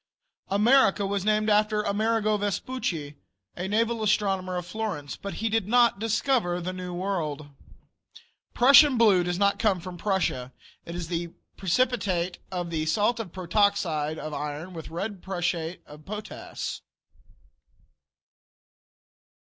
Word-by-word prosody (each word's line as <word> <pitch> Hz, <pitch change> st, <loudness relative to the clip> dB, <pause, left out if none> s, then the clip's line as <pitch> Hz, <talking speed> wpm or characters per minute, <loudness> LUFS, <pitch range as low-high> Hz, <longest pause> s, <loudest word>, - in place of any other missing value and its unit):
America 210 Hz, 0 st, +4 dB
was 200 Hz, -1 st, -1 dB
named 215 Hz, +1 st, +2 dB
after 210 Hz, 0 st, +2 dB
Amerigo 215 Hz, +1 st, +1 dB
Vespucci, 200 Hz, -, -3 dB, 0.4 s
a 180 Hz, +2 st, -4 dB
naval 225 Hz, +3 st, 0 dB
astronomer 195 Hz, -3 st, +1 dB
of 175 Hz, -, -4 dB
Florence, 180 Hz, -7 st, -4 dB
but 200 Hz, -, -7 dB
he 225 Hz, -, -1 dB
did 225 Hz, -3 st, 0 dB
not 235 Hz, -2 st, +4 dB
discover 220 Hz, -4 st, +1 dB
the 180 Hz, +1 st, -4 dB
New 180 Hz, -1 st, -6 dB
World. 170 Hz, -6 st, -3 dB, 1.1 s
Prussian 275 Hz, +2 st, +7 dB
blue 205 Hz, -6 st, +5 dB
does 175 Hz, 0 st, -2 dB
not 200 Hz, +1 st, +2 dB
come 205 Hz, -5 st, +2 dB
from 175 Hz, 0 st, -8 dB
Prussia. 165 Hz, -11 st, -1 dB, 0.3 s
It 170 Hz, -, -6 dB
is 175 Hz, -2 st, -4 dB
the 170 Hz, 0 st, -4 dB, 0.2 s
precipitate 190 Hz, -3 st, 0 dB
of 175 Hz, -2 st, -3 dB
the 155 Hz, -1 st, -1 dB
salt 210 Hz, +8 st, +2 dB
of 210 Hz, -6 st, -5 dB
protoxide 180 Hz, -5 st, 0 dB
of 155 Hz, -1 st, -6 dB
iron 150 Hz, +5 st, -5 dB
with 160 Hz, -2 st, -8 dB
red 190 Hz, +4 st, -5 dB
prussiate 175 Hz, -2 st, -3 dB
of 150 Hz, 0 st, -13 dB
potass. 210 Hz, +3 st, -6 dB
195 Hz, 130 wpm, -26 LUFS, 170-215 Hz, 1.1 s, Prussian